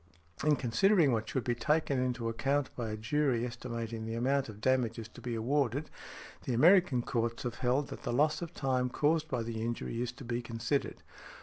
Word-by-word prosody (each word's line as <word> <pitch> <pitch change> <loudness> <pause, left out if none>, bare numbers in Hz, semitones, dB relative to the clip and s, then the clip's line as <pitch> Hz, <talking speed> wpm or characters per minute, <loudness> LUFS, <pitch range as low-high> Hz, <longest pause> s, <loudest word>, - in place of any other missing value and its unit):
In 150 0 +4
considering 140 - +3
what 110 -2 -1
should 130 - -1
be 120 - 0
taken 145 +2 +1
into 125 -2 -1
account 135 +5 0
by 115 -3 -3
a 110 - -4
jury 125 +1 +1
estimating 115 -2 -5
the 115 +1 -4
amount 135 +2 +1
of 105 -1 -9
damages 115 -2 0
to - - -13
be 120 -2 -3
awarded, 135 +4 0 0.5
the 125 - 0
American 160 -2 +5
courts 115 -2 -1
have 120 -1 -4
held, 130 +3 +1
that - - -8
the - - -3
loss 150 +5 +2
of 170 -1 -5
time 130 -4 0
caused 155 +4 +1
by 125 -4 -1
the 115 -1 -4
injury 115 0 -3
is 125 -1 -2
to 125 - -11
be 120 0 -2
considered. 115 +4 -2
125 Hz, 195 wpm, -32 LUFS, 115-140 Hz, 0.5 s, American